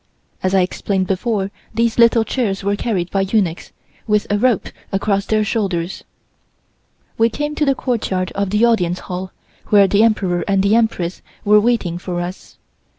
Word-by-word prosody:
(As 185 Hz, +1 st, 0 dB
I 190 Hz, -, +5 dB
explained 185 Hz, +1 st, -1 dB
before 195 Hz, +1 st, -1 dB, 0.2 s
these 230 Hz, 0 st, +1 dB
little 230 Hz, -1 st, +5 dB
chairs 215 Hz, -5 st, -2 dB
were 200 Hz, +1 st, +1 dB
carried 195 Hz, -5 st, -2 dB
by 195 Hz, -, +1 dB
eunuchs, 195 Hz, -4 st, -1 dB, 0.4 s
with 210 Hz, -1 st, +2 dB
a 205 Hz, -, +2 dB
rope 245 Hz, -3 st, +1 dB, 0.2 s
across 200 Hz, 0 st, 0 dB
their 215 Hz, -1 st, +2 dB
shoulders.) 195 Hz, -5 st, -2 dB, 1.2 s
We 225 Hz, +1 st, +4 dB
came 295 Hz, +5 st, -3 dB
to 300 Hz, -, 0 dB
the 275 Hz, -1 st, +2 dB
courtyard 200 Hz, -8 st, -2 dB
of 200 Hz, -1 st, -2 dB
the 210 Hz, +4 st, +3 dB
Audience 180 Hz, -7 st, +1 dB
Hall 185 Hz, 0 st, -6 dB, 0.4 s
where 200 Hz, -2 st, +5 dB
the 200 Hz, +2 st, +3 dB
Emperor 195 Hz, -6 st, +2 dB
and 195 Hz, -1 st, +2 dB
the 200 Hz, +1 st, +3 dB
Empress 205 Hz, -6 st, 0 dB, 0.2 s
were 210 Hz, +1 st, +6 dB
waiting 205 Hz, -7 st, 0 dB
for 175 Hz, -1 st, -4 dB
us. 175 Hz, +2 st, -7 dB
200 Hz, 165 wpm, -19 LUFS, 185-225 Hz, 1.2 s, were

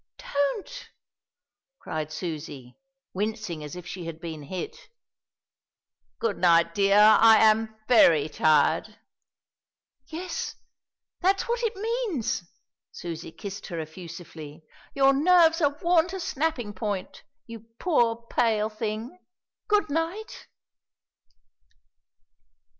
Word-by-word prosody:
"Don't!" 400 Hz, -, -3 dB, 0.9 s
cried 155 Hz, -, -5 dB
Susie, 150 Hz, -6 st, -6 dB, 0.4 s
wincing 210 Hz, -5 st, -3 dB
as 150 Hz, +3 st, -7 dB
if 180 Hz, -1 st, -9 dB
she 180 Hz, -2 st, -7 dB
had 165 Hz, -1 st, -7 dB
been 160 Hz, -2 st, -7 dB
hit. 415 Hz, -, -7 dB, 1.3 s
"Good 460 Hz, -, -2 dB
night, 170 Hz, -1 st, +4 dB
dear, 200 Hz, +1 st, +3 dB
I 220 Hz, +1 st, +7 dB
am 220 Hz, 0 st, +3 dB
very 165 Hz, -, +5 dB
tired." 155 Hz, 0 st, +2 dB, 1.1 s
"Yes, 345 Hz, +4 st, -5 dB, 0.6 s
that's 385 Hz, +2 st, +1 dB
what 475 Hz, 0 st, -1 dB
it 455 Hz, -2 st, -1 dB
means!" 430 Hz, -, -2 dB, 0.5 s
Susie 165 Hz, -2 st, -7 dB
kissed 200 Hz, +3 st, -8 dB
her 170 Hz, -2 st, -5 dB
effusively. 160 Hz, -1 st, -9 dB, 0.3 s
"Your 275 Hz, 0 st, +5 dB
nerves 330 Hz, +3 st, +4 dB
are 290 Hz, -1 st, +1 dB
worn 340 Hz, -1 st, +4 dB
to 380 Hz, +2 st, -6 dB
snapping 280 Hz, -, -2 dB
point, 200 Hz, -1 st, -4 dB, 0.2 s
you 230 Hz, -1 st, -11 dB
poor, 235 Hz, -9 st, +1 dB
pale 220 Hz, -3 st, +1 dB
thing. 220 Hz, +8 st, -5 dB, 0.5 s
Good 415 Hz, -7 st, +2 dB
night." 330 Hz, +8 st, -3 dB
220 Hz, 105 wpm, -26 LUFS, -, 1.3 s, I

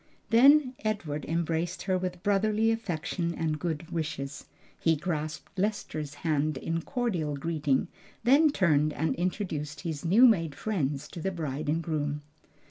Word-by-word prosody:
Then 270 Hz, +3 st, +6 dB
Edward 175 Hz, -9 st, -2 dB
embraced 165 Hz, +1 st, -1 dB
her 190 Hz, -1 st, +1 dB
with 180 Hz, -1 st, -3 dB
brotherly 215 Hz, +2 st, +2 dB
affection 175 Hz, -5 st, -2 dB
and 155 Hz, -2 st, -1 dB
good 170 Hz, 0 st, -3 dB
wishes. 150 Hz, -4 st, -4 dB, 0.3 s
He 165 Hz, -1 st, +3 dB
grasped 155 Hz, +3 st, -4 dB
Lester's 155 Hz, -7 st, -2 dB
hand 155 Hz, -1 st, 0 dB
in 165 Hz, 0 st, -2 dB
cordial 180 Hz, -, -1 dB
greeting, 150 Hz, -2 st, 0 dB, 0.4 s
then 280 Hz, +6 st, +6 dB
turned 155 Hz, -, +2 dB
and 160 Hz, +2 st, 0 dB
introduced 160 Hz, -5 st, -3 dB
his 160 Hz, -3 st, -4 dB
new 200 Hz, +9 st, +6 dB
made 165 Hz, -, +3 dB
friends 145 Hz, -10 st, -2 dB
to 170 Hz, -, -8 dB
the 195 Hz, -, 0 dB
bride 155 Hz, -5 st, -3 dB
and 165 Hz, +2 st, +1 dB
groom. 150 Hz, -2 st, -2 dB
165 Hz, 140 wpm, -29 LUFS, 150-195 Hz, 0.4 s, Then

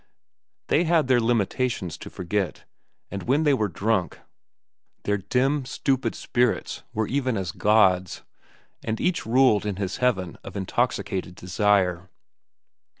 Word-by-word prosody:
They 170 Hz, -, +2 dB
had 165 Hz, -4 st, +3 dB
their 130 Hz, -2 st, +4 dB
limitations 115 Hz, -5 st, 0 dB
to -, -, -8 dB
forget, 95 Hz, -1 st, -3 dB, 0.5 s
and 100 Hz, 0 st, -4 dB
when 140 Hz, +8 st, +1 dB
they 145 Hz, -2 st, +4 dB
were 110 Hz, -6 st, +1 dB
drunk, 95 Hz, 0 st, -1 dB, 0.8 s
their 105 Hz, 0 st, +1 dB
dim, 130 Hz, +8 st, +1 dB
stupid 130 Hz, +1 st, -1 dB
spirits 125 Hz, -1 st, 0 dB
were 110 Hz, 0 st, -1 dB
even 130 Hz, -4 st, 0 dB
as 95 Hz, -4 st, -3 dB
gods, 95 Hz, -4 st, +2 dB, 0.6 s
and 110 Hz, 0 st, -2 dB
each 180 Hz, -9 st, 0 dB
ruled 120 Hz, -3 st, +4 dB
in 105 Hz, -2 st, -2 dB
his 95 Hz, -1 st, -3 dB
heaven 95 Hz, -9 st, 0 dB
of -, -, -8 dB
intoxicated 95 Hz, -3 st, -1 dB
desire. 95 Hz, -1 st, +1 dB
110 Hz, 130 wpm, -25 LUFS, 95-125 Hz, 0.8 s, their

